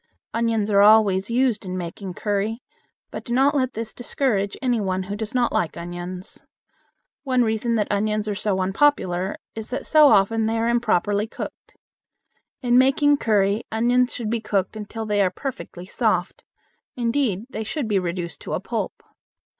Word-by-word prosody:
Onions 225 -2 0
are 200 0 +5
always 205 -2 +5
used 240 -3 +1
in 185 -1 -4
making 180 +1 -6
curry, 210 +3 -2 0.5
but - - -6
do 240 - -2
not 275 +3 +4
let 260 -3 0
this 225 0 -5
discourage 225 -5 -1
any 245 -4 0
one 190 -1 -1
who 200 +2 -5
does 220 +3 -5
not 245 -1 +2
like 165 - -1
onions. 175 +2 -7 0.8
One 255 -3 +2
reason 225 +1 0
that 210 -2 +1
onions 210 +1 0
are 210 - 0
so 200 -2 0
unpopular 190 -3 +1 0.2
is 220 -1 -7
that 260 +3 -4
so 305 -1 +6
often 220 -1 +3
they 225 +1 0
are 225 +1 0
improperly 215 -3 +1
cooked. - - -9 0.9
In 245 0 +4
making 285 +2 +4
curry 210 -2 +1
onions 245 +3 +2
should 225 -3 -4
be 230 -1 -1
cooked 200 -2 -1
until 220 +1 -6
they 210 -1 +1
are 190 - +3
perfectly 185 -5 -7
soft. - - -1 0.5
Indeed 235 -4 0
they 220 - -4
should 245 +4 -3
be 205 -3 +2
reduced 175 -1 -4
to - - -5
a - - 0
pulp. - - -4
220 Hz, 170 wpm, -23 LUFS, 195-240 Hz, 0.9 s, so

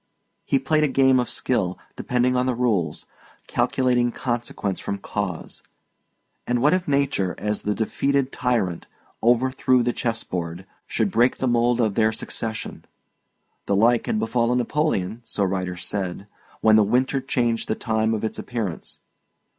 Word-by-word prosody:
He 135 - +2
played 155 +3 +1
a - - +4
game 130 -1 +4
of 125 - -1
skill, 95 -8 0 0.2
depending 125 +1 +1
on 125 0 +1
the 130 - +1
rules, 105 -11 0 0.4
calculating 125 -2 +1
consequence 120 -6 -3
from 100 - -3
cause; 100 -3 -5 0.9
and 120 0 +1
what 145 +6 +4
if 185 -1 0
nature, 140 -10 +1
as 105 0 -1
the 105 0 -1
defeated 135 +4 0
tyrant 115 -10 -1 0.3
overthrew 130 +1 +3
the 120 0 0
chess 115 -2 -2
board, 85 +1 -5 0.2
should 110 -4 0
break 120 +5 +3
the 130 - -1
mould 120 0 +2
of 110 -4 +2
their 110 +1 +3
succession? 110 0 -4 0.8
The 100 - +2
like 115 +3 +3
had - - 0
befallen 115 +2 +1
Napoleon 120 - -1
(so 105 - -2
writers 90 -2 -2
said) 95 -1 -3 0.4
when 110 0 +6
the 110 - +6
winter 130 +6 +1
changed 120 -3 0
the 110 - 0
time 110 -1 0
of 110 - -4
its 110 - -3
appearance. 110 -9 -5
115 Hz, 155 wpm, -23 LUFS, 105-125 Hz, 0.9 s, when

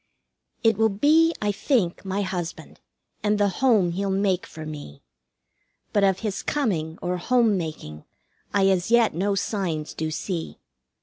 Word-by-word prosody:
It 225 -2 +4
will 220 0 +4
be, 305 +11 +4
I 205 - +2
think, 200 - 0
my 195 +1 -2
husband, 180 -3 -5 0.4
and 210 0 +1
the 205 -1 +3
home 210 -4 +2
he'll 195 +3 -2
make 190 -1 0
for 155 -1 -9
me; 145 - -9 0.9
But 205 - +3
of 190 -1 +2
his 205 -3 -2
coming 170 - -1
or 180 +1 -1
home 230 +3 +2
making, 155 - -6 0.5
I 200 -1 +3
as 185 +1 +1
yet 235 -1 +4
no 195 +5 0
signs 180 -7 -2
do 160 0 -3
see. 165 +1 -4
195 Hz, 150 wpm, -24 LUFS, 170-215 Hz, 0.9 s, It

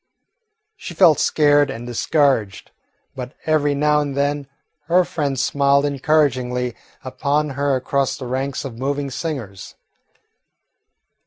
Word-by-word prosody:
She 180 - -9
felt 165 -3 +5
scared 145 -2 +3
and 120 -3 -6
discouraged, 120 -4 0 0.4
but 125 0 -7
every 145 -2 +1
now 150 +1 +2
and 140 -2 -4
then 145 0 -1 0.4
her 180 +2 +3
friend 145 -5 -2
smiled 140 +1 +2
encouragingly 130 -4 0 0.3
upon 145 +3 -1
her 140 0 0
across 135 +1 -1
the 130 - -7
ranks 135 +3 -3
of 120 -4 -8
moving 140 +1 -2
singers. 125 - -6
140 Hz, 115 wpm, -20 LUFS, 130-150 Hz, 0.4 s, felt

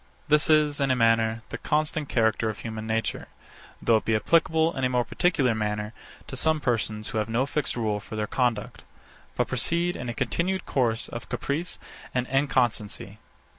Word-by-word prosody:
This 150 +1 +4
is, 150 -2 +4
in 135 - +2
a 130 - +3
manner, 115 -1 +2
the - - -6
constant 155 -1 0
character 110 -1 +2
of 110 - -6
human 110 -1 -5
nature; 110 0 -2 0.5
though 115 - +4
it - - -4
be 110 - +2
applicable, 160 +6 +2
in 135 - -3
a 130 - +3
more 125 -1 +1
particular 135 -3 +2
manner, 105 0 -2 0.3
to - - -7
some 155 +4 +2
persons 110 -5 -1
who 115 -4 -1
have 105 0 -2
no 120 +4 +1
fixed 145 0 -2
rule 110 -3 0
for 110 - -9
their 105 0 -1
conduct, 120 -2 -1 0.5
but - - +1
proceed 170 +1 +1
in 125 - -5
a 120 - -4
continued 185 +2 -1
course 115 -4 0
of 120 -3 -8
caprice 160 +5 -2 0.4
and 125 -1 +1
inconstancy. 120 -6 0
120 Hz, 180 wpm, -26 LUFS, 110-150 Hz, 0.5 s, This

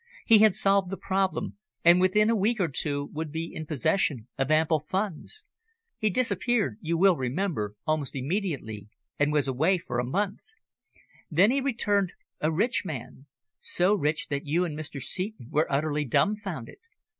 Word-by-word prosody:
He 225 -2 +7
had 215 -3 +5
solved 195 -2 +2
the 195 - -4
problem, 190 +1 -1 0.3
and 175 +1 +7
within 210 +4 +3
a - - +2
week 215 +2 +1
or 175 -4 +1
two 145 +1 +1
would 155 0 -4
be 165 +2 -4
in 155 -1 -6
possession 140 - 0
of 135 +1 -1
ample 155 0 +3
funds. 195 - -4 0.5
He 215 - +2
disappeared, 205 - 0
you 165 +1 -1
will 190 +1 +5
remember, 130 - -2
almost 155 -3 -1
immediately, 135 - -3 0.3
and 145 0 +2
was 150 -2 +2
away 155 +9 +2
for 120 -8 -4
a - - +1
month. 195 +10 -1 0.9
Then 185 +8 +4
he 275 +1 +1
returned 205 -8 0 0.3
a 155 - +1
rich 220 +10 +1
man 140 - -7 0.3
so 180 +3 +2
rich 155 -5 -1
that 140 +1 -3
you 170 +5 +1
and 155 -4 -5
Mr. 150 -2 -6
Seton 185 - -4
were 155 +1 +1
utterly 150 +1 0
dumbfounded. 195 - -1
165 Hz, 165 wpm, -27 LUFS, 145-200 Hz, 0.9 s, He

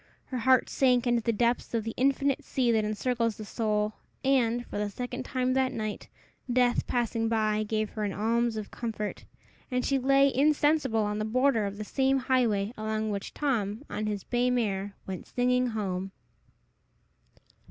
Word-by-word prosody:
Her 255 - -4
heart 260 +1 +4
sank 250 -2 +2
into 240 -1 +2
the 230 - +1
depths 235 +2 0
of 225 - 0
the 225 +1 -4
infinite 275 +1 +1
sea 250 -3 +1
that 220 -1 +2
encircles 230 +1 -1
the 215 - -7
soul, 210 0 -1 0.3
and, 245 -3 +2
for - - -5
the 210 0 -1
second 245 +4 -5
time 255 -1 0
that 260 0 +2
night, 215 -2 -4 0.4
Death 245 0 +2
passing 230 -2 0
by 215 -1 +1
gave 215 0 -1
her 215 - -4
an 205 - -1
alms 225 +3 0
of 215 - -6
comfort, 220 -3 -4 0.4
and 250 -1 -1
she 275 -1 +2
lay 275 +1 +4
insensible 290 -4 +3
on 210 0 -2
the - - -1
border 230 -1 +2
of 200 0 -6
the 215 - -4
same 270 +3 +2
highway 235 -5 +1
along 215 0 -2
which 200 -1 -4
Tom, 230 -5 -1
on 215 +1 -2
his 205 -2 -3
bay 245 0 +1
mare, 205 -5 -1
went 190 -1 -6
singing 250 0 +1
home. 195 -4 -3
230 Hz, 175 wpm, -28 LUFS, 215-255 Hz, 0.4 s, heart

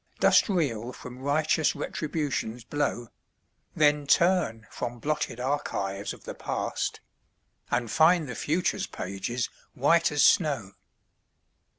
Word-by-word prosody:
Dost - - +5
reel 125 - -1
from 125 +1 -10
righteous 155 +3 +1
Retribution's 145 -7 -3
blow? 130 -3 -2 0.7
Then 150 -1 +3
turn 170 -11 +3
from 120 0 -4
blotted 150 -1 -2
archives 105 -8 -2
of - - -11
the - - -6
past, - - -3 0.7
And 120 -2 -1
find 165 0 +4
the 125 - -5
future's 165 +8 -1
pages 100 +6 -3 0.3
white 165 +6 +3
as 145 - +3
snow. 140 - +3
140 Hz, 110 wpm, -27 LUFS, 120-155 Hz, 0.7 s, Dost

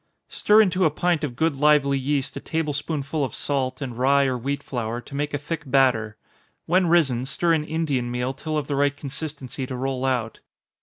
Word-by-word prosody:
_ - - -18
Stir 215 +1 +5
into 185 -1 +1
a 160 - +5
pint 170 +1 0
of 130 -5 -3
good 160 +2 +1
lively 145 -1 +4
yeast 140 +1 -1
a - - -4
table 160 -2 -2
spoonful 145 0 -2
of 130 - -3
salt, 135 -1 -2
and 125 -3 -5
rye 140 +3 +3
or 130 -1 0
wheat 140 +4 -3
flour 120 -2 -3
to 125 - -13
make 145 +1 -2
a 145 - -1
thick 150 +3 -4
batter. 125 -6 +2 0.5
When 180 +2 +3
risen, 145 -8 +3
stir 170 +4 +2
in 155 -2 +1
Indian 150 -6 -1
meal 125 +2 -2
till 155 +3 -4
of 150 - -1
the 140 - -2
right 145 0 +1
consistency 140 -2 -6
to 130 - -5
roll 130 0 -2
out. 125 -4 -1
140 Hz, 210 wpm, -24 LUFS, 130-155 Hz, 0.5 s, Stir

